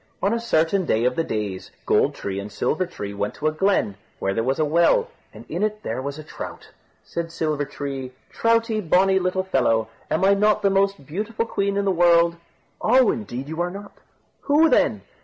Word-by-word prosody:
On 200 +3 +1
a 230 - 0
certain 190 -4 +1
day 115 -7 +1
of 125 0 +1
the 165 - +1
days, 105 -8 -4 0.2
Gold - - +2
tree 100 -1 -4
and 100 +1 -7
Silver 155 - -1
tree 100 - -6
went 100 +1 -3
to 150 - -7
a 155 - +3
glen, 155 - +1 0.2
where 95 - -1
there 115 - 0
was 135 +3 0
a 155 - +2
well, 170 - +3 0.2
and - - -13
in - - -4
it 215 0 -1
there 120 +3 -3
was 140 +2 -5
a 155 - -8
trout. 155 - -9 0.3
Said 170 -1 -5
Silver 155 -3 -1
tree, 135 -2 -6 0.2
"Troutie, 230 -1 +1
bonny 190 +2 +3
little 185 0 0
fellow, 115 -12 +1 0.2
am 160 - 0 0.2
not 210 0 +4
I - - -15
the 200 - +3
most 195 -5 +1
beautiful 215 +9 -3
queen 200 -2 -1
in 200 - 0
the 195 - +2
world?" 170 -1 +4 0.5
"Oh! 250 +1 +5
indeed 135 - -5
you 160 +2 -3
are 175 - 0
not." 200 +3 -9 0.5
"Who 305 +3 +5
then?" - - +2
170 Hz, 205 wpm, -23 LUFS, 135-200 Hz, 0.5 s, Oh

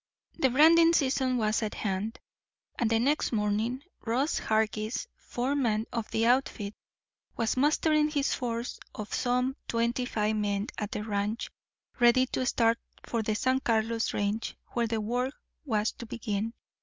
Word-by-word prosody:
The 265 - +4
branding 330 +5 +6
season 260 -4 +2
was 215 -1 +1
at 215 -1 -3
hand, 205 +2 -2 0.6
and 230 - +2
the 225 - +3
next 280 +6 +1
morning 220 +4 0 0.2
Ross 255 +7 0
Hargis, 220 +1 0
foreman 245 -4 -1
of 230 -2 -3
the 225 - +1
outfit, 235 -4 +1 0.6
was 230 -2 +1
mustering 305 +2 +3
his 285 -2 0
force 235 -1 -3 0.2
of 215 0 -6
some 250 +2 +1
twenty 235 +2 0
five 215 -2 0
men 205 0 -1
at 210 - -2
the 210 - -3
ranch, 210 +1 -2 0.5
ready 245 +2 +6
to 255 0 -2
start 230 -1 +3 0.3
for 230 - -1
the 215 0 -1
San 260 +4 +2
Carlos 225 -2 0
range, 205 +2 -2
where 235 -1 0
the 225 0 -1
work 245 +5 -1 0.3
was 220 -4 +1
to 235 - -10
begin. 220 0 -3
230 Hz, 150 wpm, -29 LUFS, 215-255 Hz, 0.6 s, branding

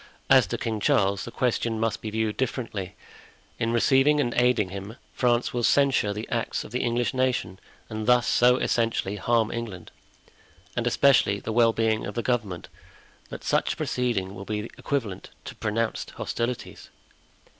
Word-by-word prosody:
As - - +7
to - - -3
King 110 -2 -3
Charles, 100 -1 +2
the - - -6
question 115 -2 0
must 115 0 -1
be 110 - -4
viewed 110 0 -1
differently; 115 -7 -3 0.6
in 115 -1 0
receiving 135 +5 +4
and 120 -4 0
aiding 120 -5 +2
him, 100 +3 -7 0.2
France 120 -1 +1
will 120 - -1
censure 135 -4 +3
the 105 +2 -5
acts - - -1
of - - -11
the - - -1
English 120 +1 0
nation, 125 -8 -1 0.3
and 110 0 -5
thus 125 -1 +5
so 125 +1 +4
essentially 115 -5 0
harm 115 0 +1
England, 105 -7 -6 0.8
and - - -1
especially 120 -8 +4
the 110 +3 -4
well 115 0 +5
being 110 -1 0
of 105 - -7
the 120 - -2
government, 105 -8 -2 0.6
that - - -8
such - - +1
a - - -13
proceeding 110 -7 -1
will 100 -1 -8
be 105 +2 -4
equivalent 115 -10 -3 0.2
to - - -7
pronounced 110 +1 -2
hostilities." 120 +1 -4
115 Hz, 165 wpm, -26 LUFS, 105-125 Hz, 0.8 s, As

